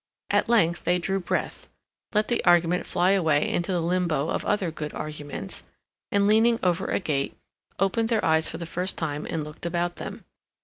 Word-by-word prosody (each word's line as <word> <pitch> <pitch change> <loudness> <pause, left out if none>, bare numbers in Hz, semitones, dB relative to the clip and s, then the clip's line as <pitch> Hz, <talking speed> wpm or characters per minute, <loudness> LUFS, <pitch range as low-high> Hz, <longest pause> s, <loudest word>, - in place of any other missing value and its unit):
At - - +2
length 175 -8 +3
they 180 +1 +3
drew 195 +2 -1
breath, 180 - -3 0.4
let 210 0 +2
the 240 - 0
argument 175 0 +3
fly 180 +2 +2
away 160 -7 +3
into 175 +2 -1
the 175 -2 0
limbo 170 -4 0
of - - -1
other 200 -5 +1
good 150 -1 -6
arguments, 145 -9 -5 0.5
and, 200 0 +3
leaning 225 +3 +4
over 180 +1 +1
a - - 0
gate, 145 -7 -2 0.4
opened 210 +4 +1
their 225 -3 +1
eyes 160 0 +3
for - - -5
the 170 - -5
first 180 +3 -3
time 150 -2 -3
and 160 -2 -2
looked 150 +1 -11
about 175 0 -1
them. - - -7
175 Hz, 185 wpm, -26 LUFS, 160-195 Hz, 0.5 s, leaning